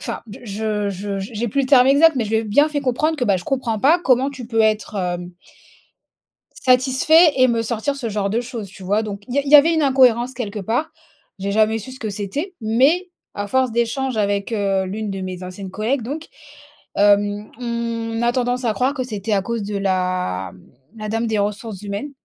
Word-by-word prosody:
Enfin - - -4 0.2
je 210 -1 -2
je 200 +1 -4
j'ai 220 +4 -4
plus 275 +7 0
le - - -1
terme 260 -2 +6
exact, 305 +4 +6
mais 240 - 0
je 210 - -6
lui 220 - +2
ai 225 - 0
bien 285 +9 +3
fait 300 -1 -2
comprendre 285 +5 0
que, 255 - -1
bah, 200 -4 +3
je 175 - -7
comprends 250 -5 -1
pas 310 +9 +5
comment 265 -4 +2
tu 255 -4 -9
peux 225 -1 0
être, 215 -1 +1
hem 175 -1 -3 1.3
satisfait 265 +6 +5
et 255 0 +5
me 230 -2 +1
sortir 235 +4 -2
ce 245 -5 -4
genre 205 -1 -1
de 225 +4 0
choses. 235 -4 -7
Tu 190 +1 -13
vois, 205 +4 +1
donc 205 -2 -6
il 250 - -5
y - - +1
a - - +1
il 275 - -4
y 300 - +9
avait 310 +3 +6
une 315 - +1
incohérence 255 -3 +3
quelque 215 -4 -5
part, 235 - -1 0.5
j'ai 200 +1 -2
jamais 220 +1 +2
su 240 +5 -9
ce 260 - -10
que 220 - -3
c'était 210 - -4
mais 270 +12 +2 0.2
à 205 0 -4
force 260 +3 +1
d'échanges 235 +2 -1
avec, 200 0 0
heu, 195 -3 0
l'une 210 +2 -4
de 195 -1 -5
mes 185 -1 -6
anciennes 185 +1 -7
collègues 230 +7 -1
donc. 290 +8 -6 0.7
Hem, 205 +1 +2
on 230 -1 -3
a 240 - +3
tendance 245 0 -1
à 225 - +1
croire 255 +7 0
que 260 - -2
c'était 215 -3 -3
à 195 - +2
cause 235 +1 -3
de 205 0 -3
la 185 - -1 0.5
la 215 -1 -5
dame 225 +1 -1
des 220 -1 0
ressources 205 0 -3
humaines 205 +8 -5
225 Hz, 220 wpm, -20 LUFS, 205-260 Hz, 1.3 s, y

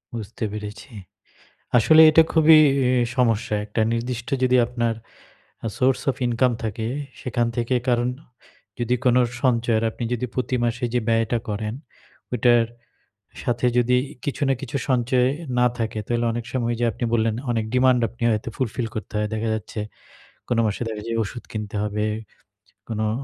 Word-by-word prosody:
বুঝতে 110 0 -6
পেরেছি। 105 +4 -7 0.9
আসলে 155 +7 +6
এটা 160 +1 +7
খুবই 160 -1 +7 0.3
ই - - +3 0.3
সমস্যা। 115 -4 +1
একটা 105 +2 -3
নির্দিষ্ট 115 0 -3
যদি 125 0 +4
আপনার 120 -1 -1 0.7
আ - - 0
সোর্স 130 0 +2
অফ 130 - 0
ইনকাম 120 +1 +2
থাকে। 110 +1 -3 0.3
সেখান 120 -2 0
থেকে 120 +1 0
কারণ 120 -1 +2 0.7
যদি 120 +1 +1
কোন 125 - +4 0.3
সঞ্চয় 120 -3 +2
আর - - -3
আপনি 120 - -6
যদি 125 +1 -1
প্রতি 130 0 -1
মাসে 120 +2 -1
যে 125 - +3
ব্যয়টা 115 +1 +2
করেন। 105 +1 -3 0.6
ওইটার 120 -1 +4 0.8
সাথে 120 0 0
যদি 125 +1 +3
ই - - -11
কিছু 145 - -3
না 135 - +3
কিছু 140 +1 -3
সঞ্চয় 125 0 +2
এ - - -2 0.3
না 125 - +5
থাকে 110 -2 -2
তাহলে 120 0 0
অনেক 120 0 -4
সময় 120 -2 0
ঐ - - -9
যে 120 - +2
আপনি 120 - -3
বললেন, 115 -1 +2 0.2
অনেক 115 -2 -1
ডিমান্ড 125 -1 +4
আপনি 120 +1 -8
হয়তো 110 +2 -2
ফুলফিল 120 -2 -2
করতে 110 - -6
হয়। 105 - 0
দেখা 110 +1 -2
যাচ্ছে 110 +1 -6 0.7
কোন 120 - +1
মাসে 105 +2 -2
দেখা 110 -2 -5
যায় 115 - -2
ওষুধ 120 +4 -7
কিনতে 105 -1 -5
হবে। 105 0 -1 0.8
কোন 110 -2 -4
ও - - 0
120 Hz, 170 wpm, -23 LUFS, 110-125 Hz, 0.9 s, এটা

